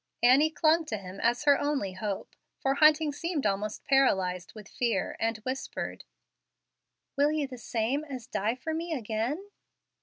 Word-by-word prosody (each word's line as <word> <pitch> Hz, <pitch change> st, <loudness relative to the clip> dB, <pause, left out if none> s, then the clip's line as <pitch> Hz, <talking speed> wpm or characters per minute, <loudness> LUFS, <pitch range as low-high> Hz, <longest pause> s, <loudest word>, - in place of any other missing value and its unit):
Annie 270 Hz, +6 st, +6 dB
clung 320 Hz, +1 st, +3 dB
to 225 Hz, -7 st, -3 dB
him 190 Hz, 0 st, -9 dB
as 240 Hz, +4 st, +1 dB
her 285 Hz, -1 st, +5 dB
only 285 Hz, -10 st, -1 dB
hope 195 Hz, +1 st, -5 dB, 0.2 s
(for 270 Hz, -, +1 dB
Hunting 305 Hz, +1 st, +5 dB
seemed 335 Hz, -1 st, -2 dB
almost 205 Hz, +1 st, -1 dB
paralyzed 190 Hz, -10 st, +2 dB
with 210 Hz, -2 st, -10 dB
fear), 230 Hz, -7 st, -1 dB
and 225 Hz, 0 st, 0 dB
whispered, 260 Hz, +1 st, -4 dB, 1.1 s
"Will 285 Hz, +2 st, +3 dB
you 305 Hz, -2 st, 0 dB
the 255 Hz, -2 st, -9 dB
same 235 Hz, +6 st, -1 dB
as 260 Hz, -5 st, -7 dB
die 225 Hz, -1 st, -1 dB
for 315 Hz, +5 st, -4 dB
me 330 Hz, +1 st, -3 dB
again?" 250 Hz, -, -3 dB
255 Hz, 155 wpm, -29 LUFS, 215-295 Hz, 1.1 s, Annie